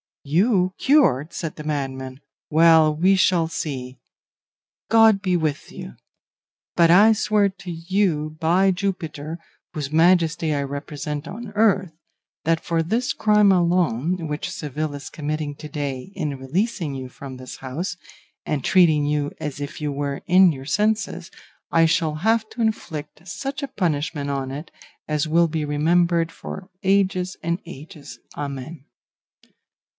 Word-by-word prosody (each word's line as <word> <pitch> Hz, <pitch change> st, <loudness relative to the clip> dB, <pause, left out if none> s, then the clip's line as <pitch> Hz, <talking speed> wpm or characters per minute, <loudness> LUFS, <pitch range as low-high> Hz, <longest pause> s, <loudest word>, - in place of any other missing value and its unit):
"'You 185 Hz, -, +2 dB
cured!' 255 Hz, -, +3 dB
said 165 Hz, -3 st, -4 dB
the 150 Hz, -, -8 dB
madman; 135 Hz, -3 st, -4 dB, 0.3 s
'well, 160 Hz, -1 st, +5 dB
we 185 Hz, +5 st, +4 dB
shall 175 Hz, -3 st, +3 dB
see; 130 Hz, -6 st, -5 dB, 0.9 s
God 225 Hz, -3 st, +5 dB
be 185 Hz, -3 st, +1 dB
with 155 Hz, -3 st, -2 dB
you; 65 Hz, -, -9 dB, 0.8 s
but 170 Hz, -1 st, +5 dB
I 205 Hz, +6 st, +7 dB
swear 210 Hz, -1 st, +2 dB
to 190 Hz, -2 st, -9 dB
you 165 Hz, -3 st, -1 dB
by 180 Hz, +4 st, +3 dB
Jupiter, 170 Hz, -5 st, -3 dB, 0.3 s
whose 145 Hz, -2 st, -4 dB
majesty 165 Hz, -1 st, +3 dB
I 145 Hz, -, 0 dB
represent 145 Hz, +2 st, -5 dB
on 230 Hz, -1 st, -7 dB
earth, 200 Hz, -4 st, +2 dB, 0.5 s
that 165 Hz, 0 st, +2 dB
for 165 Hz, -1 st, 0 dB
this 230 Hz, +9 st, -1 dB
crime 210 Hz, -2 st, +4 dB
alone, 175 Hz, -2 st, +1 dB
which 150 Hz, +1 st, -4 dB
Seville 150 Hz, 0 st, -4 dB
is 140 Hz, -, -8 dB
committing 150 Hz, -1 st, -4 dB
to 150 Hz, -, -9 dB
day 140 Hz, +1 st, -4 dB
in 150 Hz, -7 st, -3 dB
releasing 165 Hz, -, -2 dB
you 130 Hz, -1 st, -6 dB
from 130 Hz, 0 st, -9 dB
this 130 Hz, 0 st, -9 dB
house, 145 Hz, +8 st, -4 dB, 0.5 s
and 145 Hz, -4 st, -2 dB
treating 170 Hz, -5 st, +4 dB
you 145 Hz, 0 st, 0 dB
as 145 Hz, -1 st, -5 dB
if 145 Hz, +1 st, -6 dB
you 150 Hz, -1 st, -1 dB
were 140 Hz, 0 st, -3 dB
in 185 Hz, 0 st, +6 dB
your 135 Hz, -3 st, -7 dB
senses, 210 Hz, +7 st, -1 dB, 0.4 s
I 165 Hz, 0 st, +5 dB
shall 160 Hz, -1 st, +1 dB
have 220 Hz, +7 st, +1 dB
to 235 Hz, -, -6 dB
inflict 165 Hz, -7 st, -3 dB
such 270 Hz, +10 st, -5 dB
a -, -, -2 dB
punishment 150 Hz, -, -2 dB
on 135 Hz, -1 st, -2 dB
it 150 Hz, +4 st, -7 dB, 0.4 s
as 150 Hz, +1 st, 0 dB
will 170 Hz, +2 st, +3 dB
be 155 Hz, -1 st, -2 dB
remembered 165 Hz, +3 st, +2 dB
for 185 Hz, +3 st, -8 dB
ages 190 Hz, -1 st, +1 dB
and 170 Hz, +2 st, -1 dB
ages, 145 Hz, 0 st, -11 dB, 0.2 s
amen. 140 Hz, +1 st, -6 dB
160 Hz, 145 wpm, -22 LUFS, 145-185 Hz, 0.9 s, I